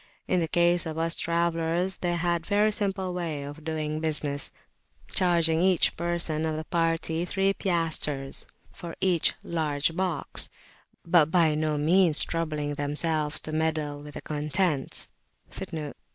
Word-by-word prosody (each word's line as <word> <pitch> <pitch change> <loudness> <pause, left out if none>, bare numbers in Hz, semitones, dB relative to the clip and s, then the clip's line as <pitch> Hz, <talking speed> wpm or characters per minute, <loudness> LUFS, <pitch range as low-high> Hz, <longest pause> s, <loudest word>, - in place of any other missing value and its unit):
In 185 - +2
the 165 - 0
case 175 0 +3
of 160 0 -5
us 165 0 +2
travellers 170 +2 0
they 175 -1 -1
had 170 0 0
a - - -15
very 210 +1 +3
simple 195 -3 -1
way 165 -5 -3
of 145 +2 -9
doing 155 -1 -2
business, 150 -3 0 0.6
charging 170 -3 +4
each 185 -1 +4
person 170 -2 -1
of 160 -1 -1
the 155 - -3
party 165 -1 0
three 195 +2 +1
piastres 160 -7 -2 0.2
for 170 -1 -8
each 180 -4 +2
large 155 -1 -1
box, 180 -4 -1 0.6
but 165 -3 +5
by 165 -3 +4
no 155 0 0
means 165 +1 +4
troubling 155 -3 -2
themselves 150 +1 0
to 155 - -5
meddle 155 -2 -1
with 145 0 -11
the - - -5
contents. 150 0 -1
165 Hz, 140 wpm, -27 LUFS, 155-175 Hz, 0.6 s, but